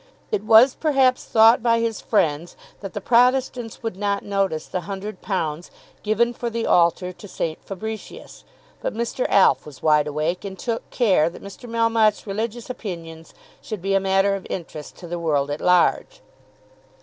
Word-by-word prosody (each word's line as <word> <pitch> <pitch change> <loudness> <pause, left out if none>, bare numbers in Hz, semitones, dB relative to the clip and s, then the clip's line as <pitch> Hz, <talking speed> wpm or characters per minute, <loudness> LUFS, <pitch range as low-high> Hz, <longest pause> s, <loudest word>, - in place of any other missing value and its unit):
It 200 - -1
was 225 +5 +6
perhaps 270 -5 +2
thought 225 +2 +5
by 230 0 +2
his 230 -1 -2
friends 165 -5 0 0.2
that 195 -2 -8
the 205 - -3
Protestants 245 0 +1
would 225 -5 -3
not 200 0 -1
notice 195 -6 -1
the 185 - -4
£100 190 -5 -4 0.3
given 230 +3 +1
for 235 0 -4
the 230 0 -3
altar 175 +1 +2
to 205 - -12
St. 165 -4 -4
Fabricius; 215 +3 -8 0.4
but - - -3
Mr. 235 +2 -2
Alf 195 - +4
was 150 -3 -13
wide 150 -1 +3
awake, 155 +4 -2
and 195 -1 -7
took 230 +3 -4
care 190 -10 +2
that 170 - -13
Mr. 200 +4 -10
Melmotte's 230 -2 +2
religious 225 +3 -4
opinions 165 -9 -8 0.3
should 210 -5 -7
be 195 0 0
a 195 - +4
matter 195 +1 +2
of 195 -1 -5
interest 160 -4 -7
to 175 - -11
the 175 +1 -4
world 145 -4 0
at 145 - -4
large. 180 -1 +2
200 Hz, 165 wpm, -22 LUFS, 175-230 Hz, 0.4 s, was